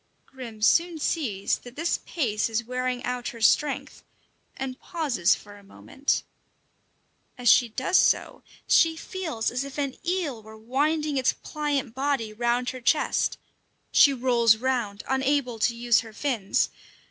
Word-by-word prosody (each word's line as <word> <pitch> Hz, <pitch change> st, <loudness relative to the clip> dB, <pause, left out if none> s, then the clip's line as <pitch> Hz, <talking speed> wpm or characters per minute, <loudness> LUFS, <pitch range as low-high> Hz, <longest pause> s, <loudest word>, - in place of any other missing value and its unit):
Grim 235 Hz, -5 st, -9 dB
soon 335 Hz, +7 st, +3 dB
sees 250 Hz, -, -1 dB
that 245 Hz, 0 st, -13 dB
this 335 Hz, +3 st, -1 dB
pace 225 Hz, -10 st, -1 dB
is 225 Hz, +1 st, -1 dB
wearing 250 Hz, +1 st, -3 dB
out 250 Hz, -1 st, -3 dB
her 230 Hz, -, -7 dB
strength, 275 Hz, +6 st, +1 dB, 0.5 s
and 265 Hz, -1 st, -5 dB
pauses 275 Hz, -, +1 dB
for 205 Hz, 0 st, -13 dB
a 200 Hz, -, -17 dB
moment. 270 Hz, +7 st, -2 dB, 1.1 s
As 245 Hz, -3 st, +5 dB
she 240 Hz, -, +5 dB
does 260 Hz, +11 st, +1 dB
so, -, -, +2 dB, 0.2 s
she 325 Hz, -1 st, +4 dB
feels 320 Hz, -11 st, -3 dB
as 250 Hz, +2 st, -2 dB
if 275 Hz, 0 st, -9 dB
an 280 Hz, -2 st, -2 dB
eel 335 Hz, -10 st, -2 dB
were 220 Hz, 0 st, -13 dB
winding 290 Hz, +6 st, 0 dB
its 260 Hz, -, +2 dB
pliant 290 Hz, -6 st, -2 dB
body 265 Hz, -5 st, -1 dB
round 240 Hz, +2 st, 0 dB
her 255 Hz, -, -9 dB
chest. 295 Hz, +6 st, +1 dB, 0.5 s
She 285 Hz, -, +7 dB
rolls 240 Hz, -4 st, +3 dB
round, 235 Hz, -5 st, -2 dB
unable 265 Hz, -3 st, 0 dB
to 235 Hz, +2 st, +1 dB
use 235 Hz, -1 st, +3 dB
her 225 Hz, -2 st, -8 dB
fins. 225 Hz, -6 st, 0 dB
250 Hz, 145 wpm, -26 LUFS, 230-285 Hz, 1.1 s, She